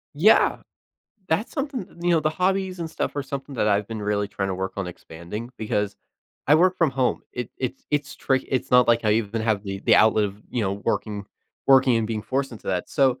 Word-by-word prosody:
Yeah, 200 +9 +5 0.7
that's 165 +8 0
something 275 - -3 0.2
You 175 - +2
know, 165 -2 +4
the 155 0 +1
hobbies 185 +2 0
and 165 -1 -4
stuff - - -3
are 145 - 0
something 140 0 -6
that 105 - +2
I've 100 0 +2
been 110 -2 -5
really 105 0 0
trying 95 -1 -3
to 95 - -1
work 95 +1 -3
on 100 -2 -2
expanding, 90 +7 -8
because 105 -2 -1 0.5
I 150 - +6
work 185 +2 +3
from 165 -5 +3
home, 130 -1 0
it 125 -2 -5
it's 130 0 -4
it's 145 -1 -1
trick 130 -1 0
it's 130 0 -1
not 125 -1 +6
like 115 -1 +3
I 105 - +4
even 110 0 0
have 110 -3 +1
the 95 -1 -5
the - - +4
outlet 110 -1 +5
of, 100 +2 -10
you 120 - -1
know, 95 -1 0
working 105 -2 -2 0.4
working 130 -3 +6
and 110 -1 0
being 110 -2 -3
forced 135 0 -2
into 110 - -11
that, 90 -2 -1
so 130 -3 +2
120 Hz, 225 wpm, -24 LUFS, 105-145 Hz, 0.7 s, I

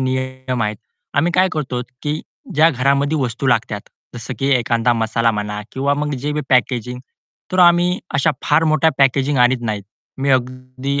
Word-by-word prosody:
नियम 130 -1 -2
आहेत. 105 0 -2 0.4
आम्ही 165 +4 +2
काय 185 +1 +4
करतो 130 -5 -2 0.2
की 150 +1 -2 0.3
ज्या 155 +2 +6
घरामध्ये 140 +3 +1
वस्तू 125 +2 -2
लागतात, 110 -4 +1 0.3
जसं 120 +2 -6
की 135 - 0
एखादा 120 0 +1
मसाला 115 0 +1
म्हणा 105 0 -3
किंवा 140 +2 0
मग 150 0 -2
जे 140 +3 -3
बी 150 - -1
पॅकेजिंग 125 -1 +1 0.5
तर 185 - -1
आम्ही 175 +1 +5 0.2
अशा 140 - +3
फार 150 +2 +3
मोठ्या 155 0 +3
पॅकेजिंग 135 +1 +2
आणत 125 0 +3
नाहीत. 105 -3 -2 0.4
मी 135 +1 0
अगदी 130 +2 -1
130 Hz, 165 wpm, -19 LUFS, 120-145 Hz, 0.5 s, ज्या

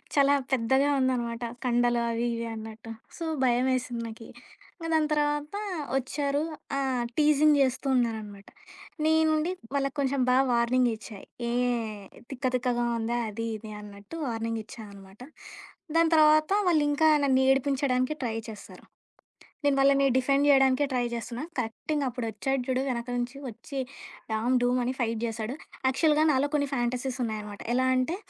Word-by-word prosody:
చాలా 280 0 +5 0.2
పెద్దగా 265 +3 +2
ఉందనమాట. 240 -2 -1 0.2
కండలు 240 -1 +2
అవి 230 +1 -1
ఇవి 230 - -3
అన్నట్టు. 220 +1 -9 0.3
సో, 335 - -5 0.2
భయమేసింది 245 -1 +1
నాకీ. 225 0 -10 0.5
ఇంక 330 -1 -6
దాని 310 -1 +3
తర్వాత 295 +3 0 0.4
వచ్చారు. 280 +2 -1 0.3
ఆ! 275 - 0 0.4
టీజింగ్ 300 0 +5
చేస్తూ 265 +1 0
ఉన్నారనమాట. 220 -5 -2 0.6
నేను 320 0 +4
నుండి 310 +4 0 0.2
వాళ్ళకి 275 0 0
కొంచెం 275 0 0
బా 250 - +4 0.2
వార్నింగ్ 240 +1 +3
ఇచ్చా. 220 -2 -10 0.3
ఏయ్! 235 -3 -1 0.3
తిక్క 270 -1 -6
తిక్కగా 240 -1 0
ఉందా? 235 +2 -1
అది 230 +2 -4
ఇది 215 0 -10
అన్నట్టు 205 +6 -11
వార్నింగ్ 225 -1 -2
ఇచ్చానమాట. 200 -3 -12 0.8
దాని 330 0 +4
తర్వాత 310 +1 +5 0.2
వాళ్ళు 315 -4 +3
ఇంకా 315 +2 +3 0.2
నన్ను 260 -1 +3
ఏడిపించడానికి 270 0 +1
ట్రై 225 -3 -2
చేస్తారు. 210 -2 -12 0.8
నేను 285 -1 +4
వాళ్ళని 275 0 +4
డిఫెండ్ 275 +2 +2
చేయడానికే 270 0 +5
ట్రై 250 -1 +1
చేస్తున్నా. 235 +3 -5
కరెక్టింగ్‌గా 265 +5 -2
అప్పుడు 245 -1 -4
వచ్చాడు 265 +5 -1
చూడు. 260 0 +1
వెనక 235 -1 -3
నుంచి 245 +3 -3
వచ్చి 245 +5 -7 0.5
డామ్, 230 +4 +1
డూమ్ 250 +1 +2
అని 255 +2 -1
ఫైట్ 230 -2 -1
చేశాడు. 225 +2 -4 0.3
యాక్చువల్‌గా 300 +3 +3
నాలో 280 +1 +1
కొన్ని 285 -1 +1
ఫాంటసీస్ 250 +1 -2
ఉన్నాయన్నమాట. 210 -2 -5
ఎలా 260 +1 +2
అంటే 255 +7 0
255 Hz, 140 wpm, -27 LUFS, 230-280 Hz, 0.8 s, చాలా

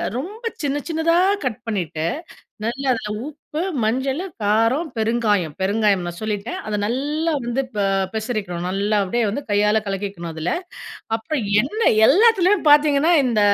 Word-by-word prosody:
ரொம்ப 405 - -6 0.2
சின்ன 285 -1 -1
சின்னதா 325 0 +1 0.3
கட் 250 -3 -2
பண்ணிட்டு 175 -7 -2 0.6
நல்லா 265 +4 -3
அதில 220 -3 -4 0.2
உப்பு, 305 +1 -6 0.2
மஞ்சளு, 265 - 0 0.2
காரம், 225 +10 +2
பெருங்காயம், 215 -8 +1
பெருங்காயம் 200 -1 +2
நான் 175 0 -6
சொல்லிட்டேன். 215 +1 -3
அத 215 - -1
நல்லா 295 +8 -1
வந்து 240 +3 0
ப - - -2 0.3
பெசரிக்கணும், 215 -6 -3
நல்லா 200 +3 0
அப்படியே 235 +5 0
வந்து 280 +8 -4
கையால 210 +1 +3
கலக்கிக்கணும் 195 -3 -4
அதுல. 160 +2 -2 0.6
அப்புறம் 250 +4 -3 0.2
எண்ணெ 430 - +1 0.2
எல்லாத்துலயும் 390 -1 +4
பார்த்தீங்கன்னா, 295 +2 +5
இந்த 230 -4 +1
230 Hz, 135 wpm, -21 LUFS, 205-290 Hz, 0.6 s, பார்த்தீங்கன்னா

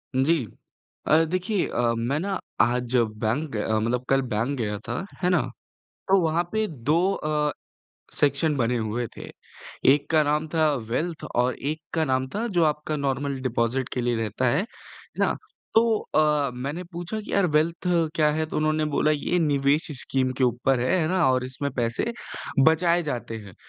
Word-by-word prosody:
जी। 135 0 +2 0.6
अ, - - +5
देखिए, 185 +4 -1
अ, 120 -1 +1
मैं 120 +6 0
ना 195 +2 -2 0.2
आज 125 +1 +1
बैंक 115 +6 0
ग 105 - -1
मतलब 120 +3 0
कल 135 0 +4
बैंक 120 +7 0
गया 105 -2 -1
था, 120 +10 -3 0.2
है 180 - +2
ना? 180 -5 +3 0.7
तो 195 - +6
वहाँ 165 +1 +1
पे 220 0 +1
2 160 - +1
अ, 150 -2 0 0.6
सेक्शन 145 +2 +2
बने 125 -1 +1
हुए 110 +2 -2
थे। - - -8 0.7
एक 145 0 -4
का 160 -1 +5
नाम 150 +2 +1
था 155 -2 +3 0.2
वेल्थ 160 +6 -2
और 125 +1 +2
एक 155 +3 -3
का 160 -1 +2
नाम 130 -2 0
था 225 +3 -1
जो 170 - +5
आपका 150 0 0
नॉर्मल 140 -1 -2
डिपोज़िट 125 +1 0
के 125 - -1
लिए 120 -1 +1
रहता 115 +3 -1
है। 140 +7 +2
है 200 - -3 0.5
ना? - - +2 0.4
तो 225 -1 +4 0.2
अ, 150 -2 +3
मैंने 140 +8 -4
पूछा 175 +5 -4
कि 210 - -9
यार 200 -2 +3
वेल्थ 165 +4 0 0.3
क्या 155 -2 +3
है? 160 +1 -1
तो - - -5
उन्होंने 155 0 +1
बोला 155 - +3
ये 165 +4 0
निवेश 145 -1 +2
स्कीम 130 -1 0
के 130 - +4
ऊपर 125 +1 +1
है, 130 +10 +2
है 155 - +1
ना? 185 -1 +2
और 130 0 +1
इसमें 135 +2 -4
पैसे 120 - -1 0.6
बचाए 170 +2 +2
जाते 125 -6 -4
हैं। 100 -4 -12
145 Hz, 180 wpm, -25 LUFS, 125-165 Hz, 0.7 s, तो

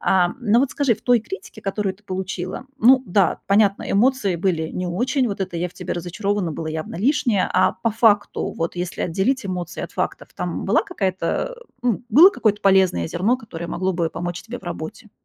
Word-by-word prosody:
Ам, 180 +4 +2
но 230 0 +3
вот 275 - +1
скажи, 280 -5 +1
в 215 - -18
той 245 -2 +4
критике, 375 - -9
которую 195 -1 -2
ты 210 - -28
получила, 185 +2 -4 0.2
ну 255 +3 +6
да, 190 0 +2
понятно, 200 0 +3
эмоции 210 -4 +2
были 165 -3 -1
не 180 0 -3
очень, 245 +8 0
вот 200 -1 -5
это 185 -2 -3
"я 175 +1 -1
в - - -19
тебе - - -5
разочарована" 185 +1 -2
было 160 +1 -5
явно 155 +1 -5
лишнее, 235 - +2
а - - +4
по 230 - +3
факту, 210 -2 +2
вот 165 +1 -3
если 175 0 -3
отделить 200 +7 0
эмоции 180 -2 -4
от - - -10
фактов, - - -3
там - - -3
была - - +3
какая-то 190 - -2 0.3
э, - - -13 0.2
ну, 245 -2 0
было 330 - +9
какое-то 210 - 0
полезное 190 - +3
зерно, 210 +9 +1
которое 170 -8 -8
могло 185 +2 -1
бы 170 -1 0
помочь 175 +1 -5
тебе 245 +2 -7
в - - -19
работе? 175 +6 -7
195 Hz, 200 wpm, -22 LUFS, 175-230 Hz, 0.3 s, было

